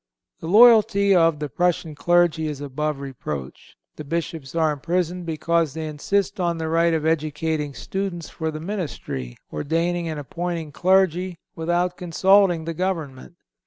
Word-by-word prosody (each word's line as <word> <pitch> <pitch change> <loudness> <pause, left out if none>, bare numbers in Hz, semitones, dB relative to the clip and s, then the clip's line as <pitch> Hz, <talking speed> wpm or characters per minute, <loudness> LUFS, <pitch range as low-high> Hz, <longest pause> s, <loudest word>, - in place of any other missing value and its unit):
The 160 - -7
loyalty 205 -1 +6
of 165 -3 +4
the 150 0 -3
Prussian 170 +2 0
clergy 170 0 +2
is 150 -2 -5
above 145 +1 -3
reproach. 75 - -7 0.2
The 155 - -6
Bishops 160 -2 -4
are 160 -2 +2
imprisoned 175 +4 -2
because 165 -1 0
they 160 -1 -4
insist 200 +7 -1
on 170 -2 0
the 160 -1 -3
right 165 0 +3
of 155 -1 -2
educating 155 -2 -1
students 190 -4 -4
for 160 -1 -4
the 155 0 -5
ministry, 155 - -5 0.2
ordaining 165 - -1
and 155 -2 -4
appointing 165 +2 -4
clergy, 185 +1 +2 0.2
without 175 +2 0
consulting 180 -1 +3
the 165 - -3
government. 165 -5 -4
165 Hz, 145 wpm, -23 LUFS, 150-180 Hz, 0.2 s, loyalty